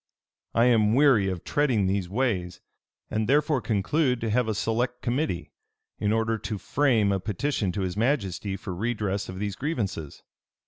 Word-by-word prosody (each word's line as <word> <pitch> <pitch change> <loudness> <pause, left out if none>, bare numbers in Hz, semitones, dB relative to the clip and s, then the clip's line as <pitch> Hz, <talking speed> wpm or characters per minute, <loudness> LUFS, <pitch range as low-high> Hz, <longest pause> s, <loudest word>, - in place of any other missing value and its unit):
"I 115 - +5
am 110 -3 +4
weary 130 -9 +5
of 90 -2 -4
treading 130 -9 +1
these 95 -1 -1
ways; 95 -6 -1 0.5
and 110 +1 -1
therefore 145 -1 +3
conclude 125 +5 +1
to 110 -1 -1
have 125 +1 +2
a 110 - -1
select 120 +4 -1
committee, 120 - -1 0.5
in 105 - +1
order 110 0 +1
to 105 0 -4
frame 115 -4 +2
a 95 - +1
petition 105 +1 -1
to 100 - -2
his 90 -1 -2
majesty 100 - -1
for 90 - -6
redress 105 -1 -2
of 95 - -6
these 100 -1 -3
grievances. 100 - -4
110 Hz, 165 wpm, -26 LUFS, 95-125 Hz, 0.5 s, I